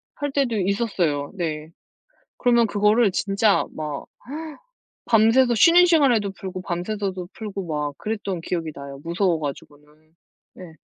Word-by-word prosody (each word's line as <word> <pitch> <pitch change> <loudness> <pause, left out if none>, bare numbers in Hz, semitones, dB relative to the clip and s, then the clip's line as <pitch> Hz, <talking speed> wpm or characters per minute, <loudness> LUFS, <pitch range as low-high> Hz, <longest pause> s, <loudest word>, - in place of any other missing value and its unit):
할 290 -1 -3
때도 270 -4 0
있었어요. 185 -8 -1
네. 155 -4 -4 0.7
그러면 235 -1 +4
그거를 210 +1 +3
진짜 200 +2 +2
막 150 -2 -5 1.0
밤새서 235 +3 +4
쉬는 340 +10 +6
시간에도 255 - +3
풀고 185 -1 -7
밤새서도 185 0 -3
풀고 200 -4 -6
막 150 -3 -3
그랬던 200 -4 -3
기억이 165 -3 -3
나요, 140 0 -9
무서워 170 0 0
가지고는. 145 0 -7 0.7
네. 175 -3 -12
195 Hz, 280 characters per minute, -23 LUFS, 165-225 Hz, 1.0 s, 쉬는